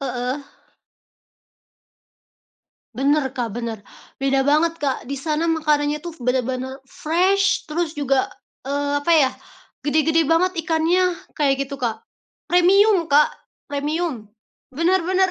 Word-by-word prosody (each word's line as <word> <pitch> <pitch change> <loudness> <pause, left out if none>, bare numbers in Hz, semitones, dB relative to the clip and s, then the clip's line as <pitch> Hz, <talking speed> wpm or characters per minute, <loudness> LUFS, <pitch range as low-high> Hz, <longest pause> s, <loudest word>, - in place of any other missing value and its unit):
Heeh. 255 +1 -3 2.6
Bener, 285 +3 +3 0.2
Kak, 230 -4 -2
bener. 230 -3 -5 0.3
Beda 270 0 +1
banget, 310 +4 +2
Kak. 275 -4 -1
Di 270 - -5
sana 305 +3 -1
makanannya 300 -2 +1
tuh 340 -1 -8
bener-bener 260 +1 -2
fresh 380 +5 +1
terus 320 0 -2
juga, 275 -3 +1 0.4
eee, 285 +1 -1
apa 340 - +3
ya, 290 -5 +5 0.6
gede-gede 315 +2 +2
banget 345 +4 +2
ikannya 350 +2 +2 0.2
kayak 275 -2 +1
gitu, 280 - -6
Kak. 230 -4 -3 0.5
Premium, 370 +1 +4
Kak, 295 0 +4 0.4
premium. 290 -3 -2 0.5
Bener 340 +6 +2
bener 375 +1 +2
295 Hz, 115 wpm, -21 LUFS, 270-335 Hz, 2.6 s, ya